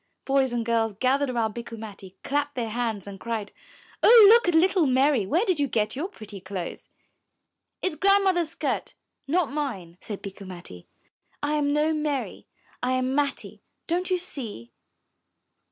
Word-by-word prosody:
Boys 270 -2 +2
and 235 -1 -2
girls 225 -2 +1
gathered 265 +5 +1
about 230 -3 -1
Bikku 235 0 -7
Matti, 200 -3 -10
clapped 290 +1 -1
their 230 -3 -3
hands 225 -4 -2
and 200 -1 -9
cried, 220 -2 -4 0.5
''Oh, 460 -2 +9
look 470 -1 +6
at 350 - +2
little 360 -1 +4
Mary, 260 -4 +3
where 345 - +2
did 370 -7 +1
you 285 - +2
get 215 -3 -1
your 305 +7 -2
pretty 215 - -11
clothes?*' 185 -2 -6 0.9
'It's 370 -5 -1
Grandmother's 385 -2 +3
skirt, - - -3 0.3
and 280 - -4
not 355 -7 +2
mine," 195 - -4
said 205 -3 -7
Bikku 195 0 -8
Matti. 175 - -10 0.6
'1 290 - 0
am 290 -1 +1
no 305 +2 +2
Mary, 300 -4 -3 0.3
I 250 +1 0
am 255 0 0
Matti, 285 0 -2 0.2
don't 355 +3 -1
you 370 - +2
see?" 230 - -8
260 Hz, 165 wpm, -26 LUFS, 215-310 Hz, 0.9 s, Oh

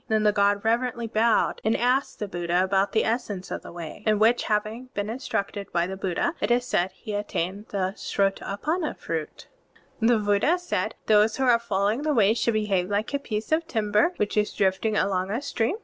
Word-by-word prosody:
Then, 215 -1 +1
the 210 - +5
god 200 0 +2
reverently 235 +1 0
bowed 225 +1 +2
and 220 +1 +2
asked 255 +3 +1
the 210 - -4
Buddha 175 -1 0
about 195 +1 +1
the 220 - +2
essence 210 -5 -2
of - - -3
the - - -10
Way, 170 0 -8
in 215 -1 +4
which 225 +3 +3
having 215 +4 -2
been 205 +1 -2
instructed 200 -5 -4
by 170 0 +1
the 190 +2 -5
Buddha, 190 - -1
it - - 0
is 245 +1 +2
said, 185 -6 +1
he 210 - -8
attained 205 0 -3
the 190 -1 -2
Srota^panna 205 - -1
fruit. 160 -2 -5 0.5
(27) 225 - +2
The 240 -1 +5
Buddha 205 - +3
said: 355 0 -2
"Those 215 0 +4
who 265 - 0
are 245 -2 +5
fol 200 -4 -2
lowing 215 +6 +1
the 300 -1 0
Way 215 -2 +5
should 235 -1 0
behave 200 -4 0
like 205 +5 -1
a 280 - +1
piece 215 -3 -4
of 320 +1 +1
timber 215 - +1
which 210 - -1
is 210 0 +1
drifting 200 +3 +1
along 190 -1 0
a 220 +4 -1
stream. 265 - -1
210 Hz, 210 wpm, -25 LUFS, 195-235 Hz, 0.5 s, the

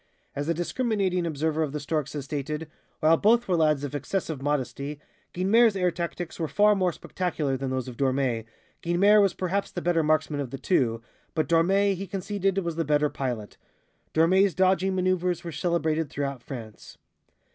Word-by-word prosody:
As 145 +3 -3
a - - +3
discriminating 185 -1 0
observer 160 0 -1
of 150 -3 -1
The 150 - -2
Storks 150 0 -2
has 145 -3 -4
stated, 150 +2 -4 0.3
"While 160 +1 +5
both 235 +5 +3
were 185 - +2
lads 155 -3 +2
of 145 - -4
excessive 155 0 -3
modesty, 145 0 -2 0.3
Guynemer's 210 +4 +4
air 180 -2 +1
tactics 170 0 -5
were 160 - -1
far 210 +6 +4
more 185 -3 +1
spectacular 160 -5 -2
than 135 0 -3
those 130 0 -2
of 125 -2 -8
Dormé, 130 -4 0 0.4
Guynemer 200 +5 +4
was 195 -3 +2
perhaps 190 +2 -1
the - - -5
better 175 -1 +1
marksman 155 -1 +1
of 140 -3 -3
the 135 - -6
two, 115 -9 0 0.3
but 155 - +1
Dormé, 195 +4 +3
he 195 +1 -5
conceded, 195 +1 -2
was 170 -4 -2
the 165 - +1
better 150 0 +2
pilot. 120 -8 -4 0.5
Dormé's 185 +4 +3
dodging 190 0 +2
maneuvers 180 -1 0
were 170 - -5
celebrated 160 -3 0
throughout 140 -2 -3
France." 115 -5 -9
165 Hz, 175 wpm, -26 LUFS, 145-185 Hz, 0.5 s, While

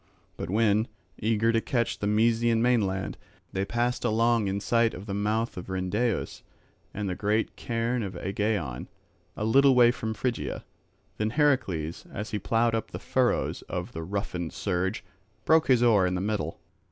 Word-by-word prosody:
But - - -5
when, 110 +2 +2 0.3
eager 115 +1 +2
to 115 0 +2 0.2
reach 120 - 0
the 105 - -1
Mysian 115 +2 +3
mainland, 105 -6 +1 0.3
they 95 0 0
passed 120 +3 -1
along 115 -1 +2
in 95 +1 -1
sight 115 +2 +2
of 95 - -8
the 100 - -4
mouth 105 +2 -1
of 90 - -7
Rhyndaeus 95 +5 -1 0.5
and 105 -1 -4
the 90 - -1
great 105 +4 0
cairn 120 +1 -1
of 95 -4 -5
Aegaeon, 95 - -2 0.5
a 105 - -2
little 135 +4 +5
way 120 -1 +7
from 110 -2 -4
Phrygia, 125 +1 -3 0.5
then 105 0 0
Heracles, 110 - 0
as 105 +3 -5
he 105 - -1
ploughed 115 +3 +1
up 115 - -2
the - - -6
furrows - - 0
of - - -4
the 80 - -6
roughened 90 -2 -4
surge, 95 +1 -1 0.4
broke 160 0 +4
his 125 -3 +4
oar 105 -6 +5
in 90 - -1
the - - -1
middle. 100 -6 -2
110 Hz, 165 wpm, -27 LUFS, 95-115 Hz, 0.5 s, way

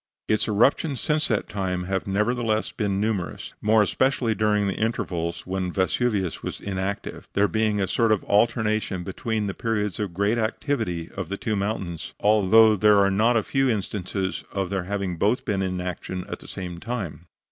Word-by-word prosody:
Its 110 - +1
eruptions 130 +6 +2
since 155 0 +1
that 110 - 0
time 95 -3 -2
have 95 +1 -2
nevertheless 110 +2 0
been 100 -3 -1
numerous 105 -4 -2
more 110 0 +4
especially 125 +1 +1
during 105 -1 +2
the 100 - 0
intervals 85 -7 -2
when 95 -1 -2
Vesuvius 95 0 0
was - - -5
inactive 95 0 -4
there 100 +1 +3
being 110 -1 +1
a 95 - +2
sort 115 +3 +2
of 105 - +2
alternation 110 -3 +1
between 105 +3 -2
the 100 - -2
periods 105 -3 -1
of 105 -4 -2
great 100 +5 +1
activity 110 - -2
of 95 -4 -4
the 100 - -3
two 110 0 -1
mountains; 95 -5 -3
although 110 +1 +6
there 105 +1 +5
are 100 0 +4
not 115 +5 +3
a 110 - +1
few 135 +2 +1
instances 95 -3 -2
of 95 -2 -2
their 95 -2 -1
having 95 -2 -2
been - - -16
both 110 +7 +1
in 95 -3 -1
action 90 0 -4
at - - -6
the - - -13
same 90 -2 -6
time. 100 -7 -5
100 Hz, 180 wpm, -25 LUFS, 95-110 Hz, -, although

